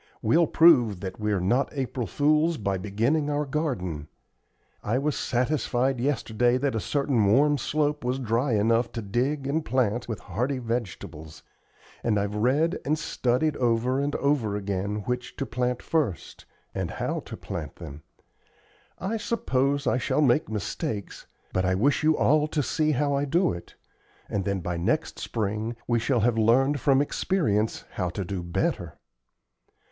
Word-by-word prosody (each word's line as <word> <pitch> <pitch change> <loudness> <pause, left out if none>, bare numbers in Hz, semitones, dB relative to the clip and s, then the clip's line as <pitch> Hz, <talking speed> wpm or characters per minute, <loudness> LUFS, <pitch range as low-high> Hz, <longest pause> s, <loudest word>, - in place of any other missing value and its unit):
We'll 160 +9 +4
prove 120 - +5
that 95 0 -6
we 105 0 0
are 100 - +1
not 120 +10 +1
April 130 -4 -3
fools 155 - +2
by 100 -2 -1
beginning 115 +10 0
our 145 0 0
garden. 115 - -2 0.7
I 115 +4 0
was 145 +2 0
satisfied 130 0 0
yesterday 120 -2 +1
that 135 0 0
a 110 - 0
certain 135 +2 +1
warm 140 +8 +4
slope 150 +2 0
was 125 +1 0
dry 120 +1 0
enough 115 +3 +2
to 115 - -4
dig 130 +8 -1
and 150 +4 0
plant 120 -4 0
with 115 -3 -4
hardy 125 +9 -2
vegetables, 95 -10 -5 0.6
and 110 -3 +2
I've 100 +1 -2
read 135 - +1
and 155 +2 +1
studied 145 -1 0
over 120 +2 +1
and 140 +1 -1
over 140 -8 +1
again 100 +1 -2
which 125 0 -3
to 135 - -3
plant 125 0 -2
first, 140 - -2 0.3
and - - -2
how - - -2
to - - -8
plant - - -6
them. 70 +2 -9 1.0
I 200 +5 -2
suppose 140 - 0
I 130 0 +2
shall 150 - +1
make 145 +3 +3
mistakes, 110 - -4 0.3
but 95 - +1
I 95 0 +2
wish 135 +10 +2
you 155 0 +3
all 150 +1 +3
to 150 -1 -1
see 155 +3 0
how 145 +1 +1
I 140 +1 +1
do 170 +6 +2
it, 85 0 -10 0.5
and 100 -2 -2
then 100 -2 -1
by 90 0 -3
next 85 - -1
spring 110 +2 -2
we 120 -1 +2
shall 120 0 +1
have 115 0 +2
learned 135 +6 +3
from 135 +2 +3
experience 110 - 0
how 90 -2 -2
to 95 +2 -4
do 95 0 -4
better. 85 0 -2
125 Hz, 160 wpm, -26 LUFS, 105-145 Hz, 1.0 s, prove